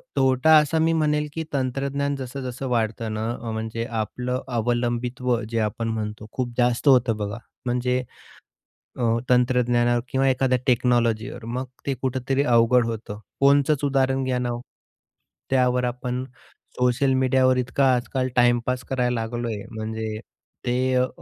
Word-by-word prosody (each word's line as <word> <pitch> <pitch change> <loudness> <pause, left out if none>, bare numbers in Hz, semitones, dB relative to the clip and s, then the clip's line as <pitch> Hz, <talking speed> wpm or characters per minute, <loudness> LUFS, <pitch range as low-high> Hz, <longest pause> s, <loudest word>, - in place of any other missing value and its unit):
तोटा 135 +4 +4
असा 150 +1 +2
मी 165 +1 +3
म्हणेल 150 -1 +1
की 160 - -3
तंत्रज्ञान 140 +1 -1
जसं-जसं 130 0 -5
वाढत 115 -2 0
ना, 110 +1 -2
अ, 115 -1 -4
म्हणजे 110 +1 -3 0.2
आपलं 125 +4 -3 0.2
अवलंबित्व 120 +1 0
जे 115 0 -1
आपण 110 +1 -1
म्हणतो, 110 -1 -4
खूप 125 -2 -3
जास्त 125 +3 +1
होतं 125 -4 +4
बघा. 105 +1 -4 0.3
म्हणजे 125 +1 0 1.0
अ, - - -2 0.3
तंत्रज्ञानावर 120 -1 +3
किंवा 135 0 +1
एखाद्या 130 0 +2
टेक्नॉलॉजीवर 120 -2 +1
मग 125 +3 -3 0.2
ते 140 - 0
कुठेतरी 130 +1 0
अवघड 120 -1 +4
होतं. 110 -2 -5 0.2
फोनचचं 140 +1 +4
उदाहरण 135 -1 +1
घ्या 130 -1 0
ना 125 -1 -1
ओ, 120 - -4 0.9
त्यावर 125 -1 +2
आपण 125 +1 -3 0.6
सोशल 125 +2 +2
मीडियावर 130 0 +3
इतका 130 +2 +1
आजकाल 130 +1 -1
टाईम 120 -1 +5
पास 125 0 -1
करायला 125 -2 +1
लागलोय 115 -2 -3
म्हणजे 110 -1 -4 0.5
ते 120 0 +1 0.2
अ, 125 0 +2
125 Hz, 140 wpm, -24 LUFS, 120-130 Hz, 1.0 s, टाईम